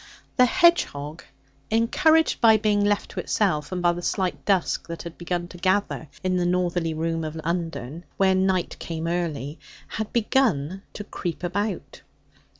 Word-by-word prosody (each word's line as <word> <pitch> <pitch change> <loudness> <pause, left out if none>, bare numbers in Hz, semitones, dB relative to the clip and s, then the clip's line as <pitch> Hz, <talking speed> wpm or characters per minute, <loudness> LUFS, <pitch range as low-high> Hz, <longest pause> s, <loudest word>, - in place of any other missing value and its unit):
The 250 - +6
hedgehog, 165 - +2 0.5
encouraged 315 +9 +3
by 220 -1 +7
being 210 -1 +2
left 205 0 0
to - - -5
itself, 175 -8 0
and 180 -1 -3
by 175 - +5
the 175 - -5
slight 185 +1 -1
dusk 195 -4 +1
that 170 -1 -6
had 170 -1 -8
begun 175 0 -3
to 175 - -11
gather 185 -3 0 0.2
in 185 0 +1
the 175 - +1
northerly 175 -2 0
rooms 165 0 -1
of 155 +1 -6
Undern 165 -2 -3
where 190 -1 +4
night 185 -1 0
came 165 -1 -4
early 165 -4 -2 0.3
had 220 -1 -4
begun 195 - +1
to 210 - -6
creep 180 -4 -5
about. 200 +2 -3
180 Hz, 155 wpm, -25 LUFS, 165-205 Hz, 0.5 s, by